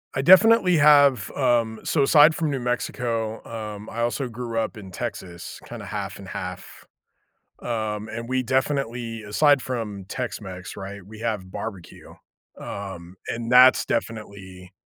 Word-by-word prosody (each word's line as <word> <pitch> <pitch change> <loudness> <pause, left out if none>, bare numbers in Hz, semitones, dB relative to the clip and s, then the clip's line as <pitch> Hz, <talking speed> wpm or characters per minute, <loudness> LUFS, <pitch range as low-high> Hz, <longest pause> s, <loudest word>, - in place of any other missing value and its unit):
I 135 - +1
definitely 190 +2 +6
have, 145 -7 +5
um 120 -4 +1
so 145 - +1
aside 150 +2 +6
from 160 -3 -1
New 135 - -2
Mexico, 120 -2 -2
um, 105 -2 -7
I 115 - -4
also 120 +3 -1
grew 115 -1 -4
up 110 +1 -3
in 95 -3 -10
Texas 85 0 -6
kinda - - -8
half - - -5
and - - -10
half. - - -7 0.8
Um, 110 -2 -3
and 115 +1 -6
we 130 0 0
definitely 125 -3 -1
aside 140 +7 +3
from 110 -7 -5
Tex 125 +2 -4
Mex, 95 -2 -8
right, 100 +1 -7
we 110 +2 -12
have 105 -5 -3
barbecue. 100 -3 -8 0.5
Um, 95 -3 -7
and 115 0 -4
that's 125 +1 +7
definitely 95 -4 -5
115 Hz, 145 wpm, -24 LUFS, 105-130 Hz, 0.8 s, that's